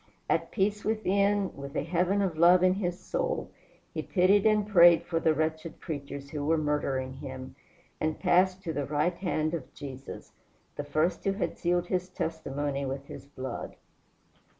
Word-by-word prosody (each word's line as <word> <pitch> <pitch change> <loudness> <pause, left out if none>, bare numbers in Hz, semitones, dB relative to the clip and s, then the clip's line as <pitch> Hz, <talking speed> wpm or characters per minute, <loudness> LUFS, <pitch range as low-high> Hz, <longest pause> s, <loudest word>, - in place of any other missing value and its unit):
At - - +1
peace 205 +1 0
within, 200 -2 +1
with 140 +1 -8
a - - 0
heaven 180 +5 +1
of 180 -4 -1
love 175 +3 +6
in 185 0 +5
his 180 -2 -2
soul, - - -2 0.4
he - - -2
pitied 195 +3 +3
and 210 -1 +3
prayed 175 -4 +7
for 165 -2 -1
the 160 -1 +2
wretched 160 +1 -2
creatures 140 -3 -6
who 150 -2 -3
were 160 +3 +2
murdering 140 -4 -1
him, 130 -2 -8 0.4
and 155 0 -1
passed 185 +1 +3
to 165 -4 -3
the 145 -1 -2
right 150 +4 +1
hand 155 -4 -1
of 170 - -5
Jesus 135 -2 -9 0.4
the 145 - -4
first 155 +5 0
who 195 - +1
had 195 - -2
sealed 175 0 +1
his 185 0 -2
testimony 145 -5 -3
with 135 +1 -4
his 140 - -10
blood. 130 -2 -6
165 Hz, 170 wpm, -29 LUFS, 145-185 Hz, 0.4 s, prayed